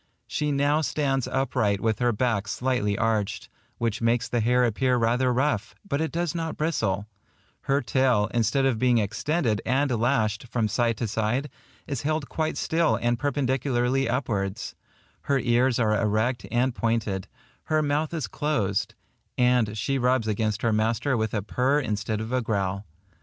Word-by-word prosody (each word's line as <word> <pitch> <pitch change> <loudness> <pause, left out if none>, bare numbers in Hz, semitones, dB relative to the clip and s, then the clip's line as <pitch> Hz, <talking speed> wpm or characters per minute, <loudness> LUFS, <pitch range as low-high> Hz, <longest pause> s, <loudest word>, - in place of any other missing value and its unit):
She 150 0 -1
now 145 +2 +2
stands 135 -4 0
upright 125 -7 0
with 110 0 0
her 120 0 +2
back 105 -3 0
slightly 115 -4 0
arched, 110 -3 -1 0.3
which 115 -1 -1
makes 115 0 +1
the 120 - 0
hair 125 +3 +3
appear 125 +2 +2
rather 120 +2 +2
rough, 125 -5 0
but 140 -4 -1
it 160 - -1
does 170 -1 -1
not 165 -2 -3
bristle; 105 - 0 0.6
her 140 0 +1
tail, 125 -4 +2
instead 120 +4 +2
of 125 -5 +1
being 125 -1 +3
extended 115 - 0
and 135 +3 +1
lashed 115 -2 0
from 115 -2 0
side 115 +1 0
to 115 - -2
side, 110 +7 -1 0.3
is 140 -5 -3
held 155 -1 -1
quite 160 -1 -2
still 165 0 +2
and 120 0 0
perpendicularly 135 -2 0
upwards; 105 -7 -2 0.6
her 140 - +4
ears 125 0 +2
are 110 -3 +2
erect 110 +3 0
and 120 +2 +1
pointed; 115 -5 -1 0.4
her 155 -1 +1
mouth 150 +2 0
is 160 -5 -2
closed; 110 -11 -1 0.4
and 125 -4 +2
she 135 +6 -1
rubs 125 -2 +2
against 110 0 -1
her 115 -2 +2
master 115 +5 +1
with 110 -2 -1
a 105 - -1
purr 130 +7 +1
instead 110 -4 -2
of 110 +2 -5
a 130 0 +1
growl. 100 -3 -2
120 Hz, 165 wpm, -26 LUFS, 110-135 Hz, 0.6 s, her